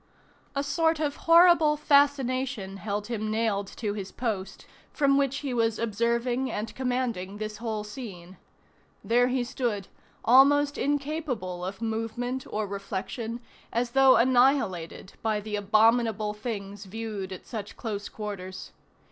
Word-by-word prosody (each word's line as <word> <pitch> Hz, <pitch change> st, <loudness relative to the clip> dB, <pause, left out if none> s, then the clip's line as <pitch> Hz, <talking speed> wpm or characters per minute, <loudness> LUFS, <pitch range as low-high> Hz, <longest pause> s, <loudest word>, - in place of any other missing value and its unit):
A 280 Hz, -, 0 dB
sort 320 Hz, +2 st, +1 dB
of 295 Hz, -2 st, -1 dB
horrible 330 Hz, -3 st, +7 dB
fascination 265 Hz, -8 st, +2 dB
held 205 Hz, +1 st, -3 dB
him 215 Hz, -1 st, -3 dB
nailed 215 Hz, -2 st, 0 dB
to 210 Hz, -3 st, -2 dB
his 195 Hz, -2 st, -6 dB
post, 215 Hz, -6 st, -4 dB, 0.3 s
from 280 Hz, -2 st, +3 dB
which 275 Hz, -1 st, +1 dB
he 265 Hz, -, -1 dB
was 225 Hz, -2 st, +1 dB
observing 235 Hz, +3 st, 0 dB
and 215 Hz, +2 st, -4 dB
commanding 245 Hz, -7 st, -2 dB
this 215 Hz, 0 st, -5 dB
whole 220 Hz, -1 st, -3 dB
scene. 195 Hz, -6 st, -9 dB, 0.7 s
There 245 Hz, +2 st, +3 dB
he 255 Hz, 0 st, 0 dB
stood, 240 Hz, -6 st, -3 dB, 0.4 s
almost 285 Hz, +4 st, +6 dB
incapable 280 Hz, -, -2 dB
of 190 Hz, +5 st, -5 dB
movement 230 Hz, +3 st, -3 dB
or 215 Hz, 0 st, -2 dB
reflection, 200 Hz, +4 st, -5 dB, 0.3 s
as 235 Hz, +1 st, -1 dB
though 270 Hz, 0 st, +6 dB
annihilated 245 Hz, -, +2 dB
by 220 Hz, -2 st, 0 dB
the 210 Hz, 0 st, -4 dB
abominable 215 Hz, +1 st, +3 dB
things 205 Hz, -2 st, -6 dB
viewed 205 Hz, -1 st, -5 dB
at 185 Hz, -, -8 dB
such 215 Hz, -4 st, -7 dB
close 205 Hz, -3 st, -4 dB
quarters. 195 Hz, -3 st, -7 dB
225 Hz, 130 wpm, -27 LUFS, 205-260 Hz, 0.7 s, horrible